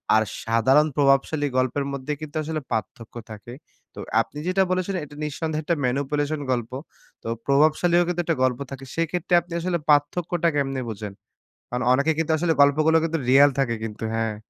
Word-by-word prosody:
আর 110 - +4 0.2
সাধারণ 130 +7 +3
প্রভাবশালী 145 +1 +2
গল্পের 130 +2 0
মধ্যে 140 +2 -3
কিন্তু 155 0 -8
আসলে 155 0 -3
পার্থক্য 110 +2 -4 0.2
থাকে। 110 +3 -10 0.4
তো - - -11 0.2
আপনি 145 - -9
যেটা 185 +1 +3
বলেছিলেন 185 0 -1
এটা 145 - -14
নিঃসন্দেহে 155 +1 -3
একটা 170 +3 0
manipulation 145 +3 -1
গল্প। 120 -2 -2 0.5
তো - - -7 0.2
প্রভাবশালীও 155 +5 +3
কিন্তু 175 0 -1
একটা 165 -3 0
গল্প 125 -1 +1
থাকে 135 0 -8
সেক্ষেত্রে 165 +2 -2
আপনি - - -22
আসলে 175 0 -1
পার্থক্যটা 160 +4 +2
কেমনে 135 -2 -1
বোঝেন? 105 -1 -7 0.6
কারণ 125 +1 -2
অনেকে 140 +4 +2
কিন্তু 160 -1 0
আসলে 165 0 +1
গল্পগুলো 155 +3 +4
কিন্তু 165 0 -1
real 140 +2 +7
থাকে 120 -4 +1
কিন্তু 110 0 -6
হ্যাঁ। 110 -1 -1
145 Hz, 165 wpm, -24 LUFS, 130-160 Hz, 0.6 s, real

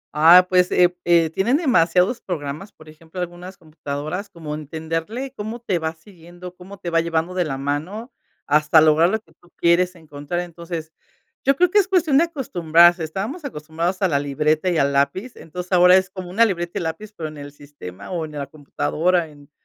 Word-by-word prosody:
Ah, 170 +4 +7
pues, 180 -1 +2
eh, 180 0 +3
eh, 170 -2 +3
tienen 220 - +1
demasiados 195 - +2
programas, 155 +2 -5
por 155 - -18
ejemplo, 160 +3 -12
algunas 180 +2 -7
computadoras, 155 +4 -6
como 160 -5 -8
entenderle 165 - -5
cómo 220 +2 -6
te 195 -7 -1
va 160 0 -3
siguiendo, 175 +1 -13
cómo 190 +2 -12
te 175 -2 -6
va 165 0 +3
llevando 165 +1 -2
de 180 -1 0
la 135 -3 -4
mano 155 - -4 0.3
hasta 150 +2 +4
lograr 155 +2 +4
lo 220 +3 -1
que 220 - -28
tú 175 - -23
quieres 180 +2 +2
encontrar. 155 +1 -5
Entonces, 170 -2 -7 0.5
yo 275 - +3
creo 360 +4 +2
que 415 - +5
es 390 - +1
cuestión 345 -7 +3
de 335 - +4
acostumbrarse. 175 - +3
Estábamos 200 - -5
acostumbrados 170 - -4
a - - +5
la 145 -5 +1
libreta 150 +4 0
y 175 - 0
al 140 -1 +1
lápiz. 140 - -1
Entonces, 180 +3 -9
ahora, 180 0 +6
es 190 +1 -1
como 185 -2 -8
una 220 +6 +4
libreta 175 -5 -3
y - - -2
lápiz, 165 +6 -5
pero 160 -2 -4
en 155 - -12
el 145 0 -9
sistema 140 - -11
o 170 -3 -2
en 155 - -11
la 145 -1 -4
computadora, 160 +4 -1
en 145 -1 -18
170 Hz, 195 wpm, -21 LUFS, 155-190 Hz, 0.5 s, Ah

